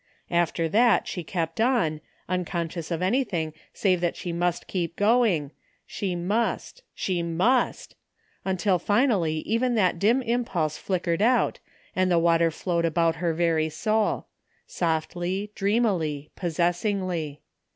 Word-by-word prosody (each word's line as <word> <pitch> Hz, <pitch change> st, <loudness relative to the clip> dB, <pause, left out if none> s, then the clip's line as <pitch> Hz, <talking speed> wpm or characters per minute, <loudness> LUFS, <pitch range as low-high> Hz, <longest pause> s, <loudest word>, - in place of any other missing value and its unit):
After 170 Hz, -1 st, +1 dB
that 220 Hz, +3 st, +3 dB
she 175 Hz, -, -4 dB
kept 165 Hz, +2 st, -2 dB
on, 190 Hz, -12 st, +2 dB, 0.3 s
unconscious 170 Hz, -2 st, -3 dB
of 170 Hz, 0 st, -2 dB
anything 185 Hz, -, 0 dB, 0.2 s
save 185 Hz, -3 st, +1 dB
that 175 Hz, -1 st, 0 dB
she 175 Hz, -, -5 dB
must 175 Hz, 0 st, -1 dB
keep 170 Hz, -3 st, -3 dB
going, 205 Hz, -, +2 dB, 0.3 s
she 190 Hz, -3 st, -3 dB
must, 210 Hz, -, -1 dB
she 180 Hz, -3 st, -1 dB
must 180 Hz, +10 st, +1 dB, 0.3 s
— -, -, -39 dB
^till 190 Hz, -1 st, +1 dB
finally 205 Hz, -, +2 dB
even 240 Hz, +5 st, 0 dB
that 185 Hz, -5 st, +2 dB
dim 235 Hz, +7 st, +3 dB
impulse 225 Hz, -11 st, -1 dB
flickered 175 Hz, -2 st, -1 dB
out 245 Hz, +3 st, +3 dB, 0.4 s
and 185 Hz, 0 st, +2 dB
the 175 Hz, -, +3 dB
water 165 Hz, 0 st, +4 dB
flowed 170 Hz, +1 st, -1 dB
about 165 Hz, 0 st, +2 dB
her 170 Hz, 0 st, 0 dB
very 160 Hz, -2 st, +1 dB
soul; 215 Hz, +5 st, 0 dB, 0.4 s
softly, 175 Hz, +4 st, -2 dB
.dreamily, 195 Hz, -9 st, 0 dB
possessingly. 175 Hz, -2 st, -1 dB
175 Hz, 130 wpm, -26 LUFS, 165-210 Hz, 0.4 s, water